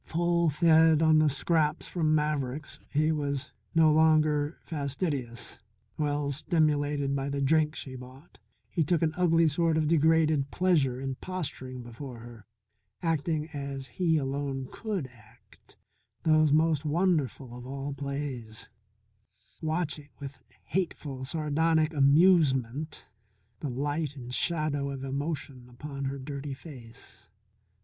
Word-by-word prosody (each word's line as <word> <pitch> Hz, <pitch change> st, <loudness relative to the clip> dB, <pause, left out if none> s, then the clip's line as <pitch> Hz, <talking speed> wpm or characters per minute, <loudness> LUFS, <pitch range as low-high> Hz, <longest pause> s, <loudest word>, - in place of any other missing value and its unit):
Full 170 Hz, 0 st, +1 dB
fed 160 Hz, 0 st, +5 dB
on 155 Hz, -1 st, +5 dB
the 155 Hz, -1 st, +4 dB
scraps 150 Hz, +2 st, +1 dB
from 155 Hz, -3 st, +1 dB
Maverick's 150 Hz, -2 st, -2 dB
he 155 Hz, +2 st, +2 dB
was 140 Hz, -3 st, -2 dB, 0.2 s
no 160 Hz, -1 st, +6 dB
longer 155 Hz, -1 st, +3 dB
fastidious 140 Hz, -5 st, -3 dB, 0.4 s
well 145 Hz, -1 st, -1 dB
stimulated 145 Hz, -2 st, +1 dB
by 140 Hz, 0 st, -2 dB
the 140 Hz, 0 st, -2 dB
drink 150 Hz, +2 st, +2 dB
she 130 Hz, -, -6 dB
brought, 130 Hz, +4 st, -12 dB, 0.3 s
he 165 Hz, -, +1 dB
took 165 Hz, +2 st, +1 dB
an 155 Hz, -1 st, +1 dB
ugly 165 Hz, -2 st, +4 dB
sort 160 Hz, +1 st, +2 dB
of 155 Hz, -1 st, +1 dB
degraded 155 Hz, -2 st, +3 dB
pleasure 150 Hz, -9 st, +2 dB
in 135 Hz, -1 st, -4 dB
posturing 130 Hz, -9 st, -5 dB
before 120 Hz, +2 st, -8 dB
her, 115 Hz, -1 st, -12 dB, 0.6 s
acting 160 Hz, -1 st, 0 dB
as 140 Hz, -2 st, -5 dB
he 165 Hz, +2 st, +1 dB
alone 135 Hz, -1 st, -3 dB
could 210 Hz, -9 st, -3 dB
act 115 Hz, -2 st, -20 dB, 0.5 s
those 155 Hz, -2 st, +4 dB
most 155 Hz, -1 st, +3 dB
wonderful 150 Hz, -, 0 dB
of 125 Hz, 0 st, -9 dB
all 140 Hz, +1 st, -4 dB
plays, 140 Hz, -5 st, -5 dB, 0.9 s
watching 155 Hz, -2 st, -2 dB
with 140 Hz, -1 st, -8 dB, 0.2 s
hateful, 150 Hz, -7 st, -3 dB
sardonic 155 Hz, +2 st, +1 dB
amusement 145 Hz, -2 st, +3 dB, 0.5 s
the 145 Hz, -, -3 dB
light 145 Hz, +3 st, -2 dB
and 125 Hz, -2 st, -8 dB
shadow 155 Hz, -3 st, 0 dB
of 135 Hz, -1 st, -5 dB
emotion 140 Hz, -2 st, -4 dB
upon 140 Hz, +2 st, -6 dB
her 135 Hz, +1 st, -3 dB
dirty 140 Hz, 0 st, -6 dB
face. 130 Hz, -5 st, -13 dB
145 Hz, 125 wpm, -29 LUFS, 135-160 Hz, 0.9 s, no